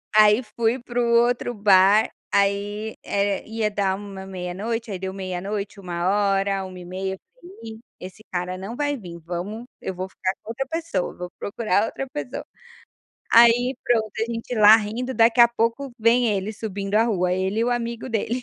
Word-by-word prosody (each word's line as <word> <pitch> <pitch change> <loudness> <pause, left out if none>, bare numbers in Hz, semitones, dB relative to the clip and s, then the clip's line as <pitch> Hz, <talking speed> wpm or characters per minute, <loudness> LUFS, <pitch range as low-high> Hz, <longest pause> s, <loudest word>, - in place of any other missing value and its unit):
Aí, 215 +2 +6
fui 235 +2 +1
para 240 0 -4
o 240 - +3 0.2
outro 245 0 -1
bar. 200 0 +5 0.2
Aí, 205 +2 0
eh, 200 0 0
ia 220 -1 -1
dar 195 -2 0
uma 195 -1 -8
meia-noite 195 +5 -4
aí 190 - -4
deu 190 0 -4
meia-noite, 195 +2 -4
1h, 195 +2 0
1:30,, 185 +1 -5
eu - - -20 0.2
falei: 365 +3 -13 0.2
"Ih, 220 - -14 0.2
esse 185 +4 -10
cara 180 0 -3
não 195 +5 -6
vai 290 +1 -1
vim. 175 -7 -9
Vamos 180 +8 -5 0.2
eu 190 - -4
vou 185 +1 -5
ficar 190 0 -2
com - - -13
outra 270 +4 -3
pessoa, 320 - -3
vou 180 0 -6
procurar 205 -1 0
outra 270 - -5
pessoa". 145 - -5 0.9
Aí, 240 +2 +6
pronto, 220 -3 +1
a - - +2
gente 230 +2 -4
lá 215 0 +8
rindo, 230 +4 -3
daqui 230 +1 +4
a 235 - +9
pouco 235 +4 -1
vem 235 +2 +4
ele 205 0 -1
subindo 205 -2 -5
a 220 - +5
rua, 180 -5 +1
ele 190 +4 0
e - - +2
o 245 - 0
amigo 235 0 -3
dele. 230 +2 -2
210 Hz, 180 wpm, -23 LUFS, 190-230 Hz, 0.9 s, a